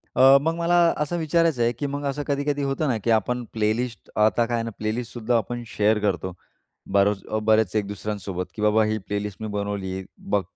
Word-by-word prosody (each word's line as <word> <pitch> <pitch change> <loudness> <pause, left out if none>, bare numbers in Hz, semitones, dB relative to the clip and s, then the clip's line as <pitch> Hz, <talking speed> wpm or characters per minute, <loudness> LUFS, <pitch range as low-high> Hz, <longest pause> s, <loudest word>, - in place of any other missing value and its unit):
अ, 135 +1 +8
मग 165 +3 0
मला 170 +1 +2 0.2
असं 150 +3 -1
विचारायचं 165 -4 +2
आहे, 115 - +3
की 135 +5 -4
मग 145 +1 -4
असं 140 +1 -2
कधी-कधी 145 0 0
होतं 140 +3 -1
ना, 125 -4 +1
की - - -1
आपण 120 +3 +1
प्लेलिस्ट. 110 +1 -1
आता 110 +2 +4
काय 120 +1 -1
आहे 115 - -1
ना 115 - -3
प्लेलिस्ट 110 +2 -3
सुद्धा 120 0 +1
आपण 120 +1 -3
शेअर 105 0 +2
करतो. 95 -3 -1 0.6
बरचं 100 +2 +2
बरेचं 110 -2 +3
एक 100 - -5
दुसऱ्यांसोबत, 100 -3 -4
की 105 - -6
"बाबा 105 +1 +4
ही 110 0 0
प्लेलिस्ट 105 0 -4
मी 110 - -3
बनवली. 100 -2 -3
बघ 100 - 0
110 Hz, 200 wpm, -24 LUFS, 105-135 Hz, 0.6 s, अ